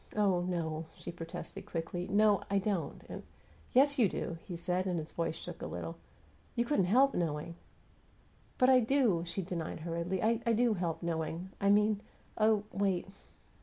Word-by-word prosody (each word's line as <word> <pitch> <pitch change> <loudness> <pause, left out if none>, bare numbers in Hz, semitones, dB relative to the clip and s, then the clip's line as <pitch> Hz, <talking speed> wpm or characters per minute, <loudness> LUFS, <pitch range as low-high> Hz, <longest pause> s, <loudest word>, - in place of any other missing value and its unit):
"Oh, 195 -4 +3
no," 165 -3 -2
she - - -6
protested, 170 0 -8
quickly. 175 +2 -3
"No, 205 0 +4
I 200 - +2
don't, 195 -3 -1
and - - -6 0.3
" - - -27
"Yes, 280 +2 +4
you 215 -5 +5
do," 165 -1 -4
he 180 - -4
said, 180 +2 -1
and 180 -2 0
his 155 -1 -5
voice 165 -1 -2
shook - - -8
a - - -3
little. 85 -1 -5 0.6
"You 235 - +1
couldn't 235 -8 +2
help 260 +9 +5
knowing." 165 -1 -2 1.0
"But 255 +1 +5
I 255 - +7
do!" 235 -7 +3
she 185 +3 -2
denied, 170 -3 -4
hurriedly. 170 +3 -2
"I 225 +1 +3 0.2
do 235 0 +3
help 175 -4 -2
knowing. 165 +2 -3
I 200 - +3
mean 210 0 +4 0.3
Oh, 215 -1 +3
wait!" 195 -2 0
185 Hz, 170 wpm, -33 LUFS, 170-215 Hz, 1.0 s, I